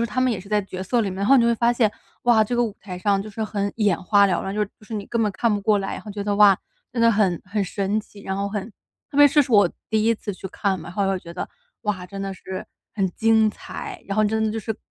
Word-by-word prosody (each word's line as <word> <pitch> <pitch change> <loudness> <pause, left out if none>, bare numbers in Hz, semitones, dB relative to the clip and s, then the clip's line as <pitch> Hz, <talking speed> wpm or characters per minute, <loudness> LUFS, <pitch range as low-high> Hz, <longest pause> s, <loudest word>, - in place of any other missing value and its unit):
是 235 - +1
他 255 - -2
们 255 -2 +2
也 190 - -3
是 195 - -14
在 210 -1 +2
角 185 -1 -6
色 235 +5 +1
里 195 - -2
面。 185 - -6
然 200 - 0
后 275 - +7
你 240 - +5
就 - - +3
会 235 - +3
发 235 +1 +2
现， 225 -4 +2 0.3
哇， 235 -3 +5
这 240 +3 -1
个 240 - +3
舞 210 -3 -4
台 180 -2 -7
上， 200 0 +2
就 215 - -6
是 220 +1 -4
很 200 -1 -2
眼 205 -6 +2
花 200 +1 +5
缭 185 - +1
乱， 195 +1 -4
就 210 - -1
是 - - -1
就 215 - -17
是 225 - -6
你 205 -1 -3
根 230 -1 0
本 210 - +1
看 230 +2 +1
不 205 - -2
过 205 0 +3
来。 195 - -3
然 - - -6
后 210 - -9
觉 200 0 -5
得 205 -1 0
“哇！ 205 -2 +7 0.3
真 240 - -2
得 230 - +6
很 195 -5 +2
很 200 +2 -1
神 200 +3 -1
奇， 205 -1 -16
然 190 0 -3
后 200 0 -1
很” 205 +1 -5 0.4
特 - - -5
别 290 0 +8
这 295 - +4
是 255 -3 0
我 205 -4 +6 0.2
第 220 -1 +1
一 230 - +4
次 205 -2 -5
去 190 - -7
看 195 0 -1
嘛， 160 - -9
然 - - -8
后 200 +1 0
又 195 - +1
会 190 - 0
觉 170 - -10
得 180 - -5 0.3
“哇！ 200 -4 -2
真 195 +2 -8
得 195 -1 -4
是 185 0 -7 0.3
很 195 -3 +1
精 220 +2 +3
彩”。 370 - -7
然 195 - -2
后 215 - +4
真 220 +1 +1
的 215 - +1
就 225 - -3
是 220 +1 -4
210 Hz, 340 characters per minute, -23 LUFS, 195-220 Hz, 0.4 s, 别